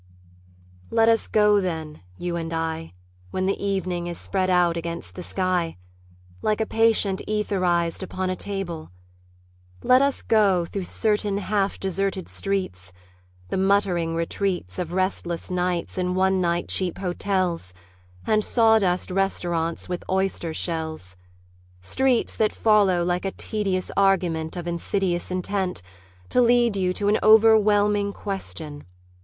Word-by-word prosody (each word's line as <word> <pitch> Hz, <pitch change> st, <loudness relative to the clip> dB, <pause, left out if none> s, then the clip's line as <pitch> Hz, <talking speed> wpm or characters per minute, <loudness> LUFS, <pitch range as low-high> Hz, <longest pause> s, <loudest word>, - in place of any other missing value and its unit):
Let 225 Hz, 0 st, +3 dB
us 225 Hz, -1 st, +2 dB
go 210 Hz, -1 st, +4 dB
then, 160 Hz, -4 st, -4 dB, 0.2 s
you 175 Hz, -1 st, -3 dB
and 165 Hz, -1 st, -4 dB
I, 160 Hz, -, -3 dB, 0.3 s
When 185 Hz, -, -2 dB
the 195 Hz, +1 st, -1 dB
evening 185 Hz, -3 st, -2 dB
is 175 Hz, -1 st, -5 dB
spread 185 Hz, -1 st, -1 dB
out 175 Hz, -2 st, +3 dB
against 170 Hz, 0 st, -5 dB
the 180 Hz, -, -7 dB
sky 180 Hz, -, -1 dB, 0.6 s
Like 215 Hz, 0 st, 0 dB
a 220 Hz, -, +1 dB
patient 220 Hz, -4 st, +2 dB
etherized 185 Hz, -6 st, 0 dB
upon 185 Hz, 0 st, -3 dB
a -, -, -2 dB
table; 185 Hz, -5 st, -5 dB, 0.9 s
Let 255 Hz, +1 st, +5 dB
us 280 Hz, 0 st, +1 dB
go, 195 Hz, -6 st, +3 dB
through 190 Hz, +2 st, -5 dB
certain 210 Hz, 0 st, 0 dB
half 200 Hz, 0 st, -1 dB
deserted 195 Hz, -1 st, -2 dB
streets, 90 Hz, -, -3 dB, 0.6 s
The -, -, -1 dB
muttering 190 Hz, -4 st, +1 dB
retreats 170 Hz, -, -2 dB
Of 170 Hz, -2 st, -3 dB
restless 180 Hz, -2 st, -2 dB
nights 180 Hz, 0 st, -1 dB
in 180 Hz, 0 st, -1 dB
one 190 Hz, 0 st, +2 dB
night 170 Hz, 0 st, 0 dB
cheap 185 Hz, -3 st, 0 dB
hotels 180 Hz, -, -1 dB, 0.5 s
And 215 Hz, 0 st, +2 dB
sawdust 220 Hz, -7 st, +3 dB
restaurants 175 Hz, -3 st, -1 dB
with 180 Hz, -1 st, -4 dB
oyster 190 Hz, -3 st, 0 dB
shells: 160 Hz, -, -3 dB, 0.6 s
Streets 250 Hz, -, +1 dB
that 215 Hz, -1 st, +2 dB
follow 200 Hz, -5 st, +3 dB
like 175 Hz, +1 st, -1 dB
a 195 Hz, -, -1 dB
tedious 195 Hz, -2 st, -2 dB
argument 180 Hz, -5 st, +1 dB
Of 175 Hz, -1 st, -5 dB
insidious 175 Hz, +1 st, -1 dB
intent 185 Hz, -, -2 dB, 0.5 s
To 250 Hz, -, +3 dB
lead 240 Hz, -2 st, +4 dB
you 185 Hz, -2 st, +1 dB
to 200 Hz, +2 st, -2 dB
an 210 Hz, +1 st, +3 dB
overwhelming 210 Hz, -2 st, +5 dB
question.... 160 Hz, -8 st, -5 dB
185 Hz, 135 wpm, -24 LUFS, 170-205 Hz, 0.9 s, Let